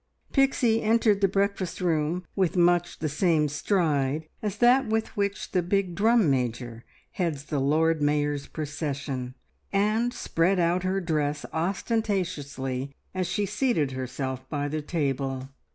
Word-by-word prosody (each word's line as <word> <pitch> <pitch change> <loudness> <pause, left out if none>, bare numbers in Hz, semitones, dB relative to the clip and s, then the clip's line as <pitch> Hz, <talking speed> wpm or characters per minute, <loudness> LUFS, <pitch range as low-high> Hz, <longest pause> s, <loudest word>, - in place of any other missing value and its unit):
Pixie 255 -5 +3
entered 220 -2 +3
the 195 - +5
breakfast 195 -2 -1
room 170 0 0
with 185 -2 +1
much 175 0 +3
the 155 - -2
same 155 0 +2
stride 150 -2 0
as 210 -1 -3
that 250 +2 +5
with 220 0 -1
which 200 -1 -2
the 180 - +2
big 185 +1 0
drum 220 +1 +4
major 120 -3 -1 0.3
heads 165 -7 -2
the 150 -1 -2
Lord 155 +3 +2
Mayor's 145 -1 0
procession, 140 -4 -4 0.4
and 215 +4 +2
spread 185 -4 +1
out 175 +1 +2
her 190 +1 0
dress 150 -3 -1
ostentatiously 160 - -2 0.2
as 185 -1 -1
she 200 +4 0
seated 195 - 0
herself 130 0 -4
by 145 -1 -1
the 155 +1 -2
table. 135 -4 -2
165 Hz, 135 wpm, -27 LUFS, 145-195 Hz, 0.4 s, the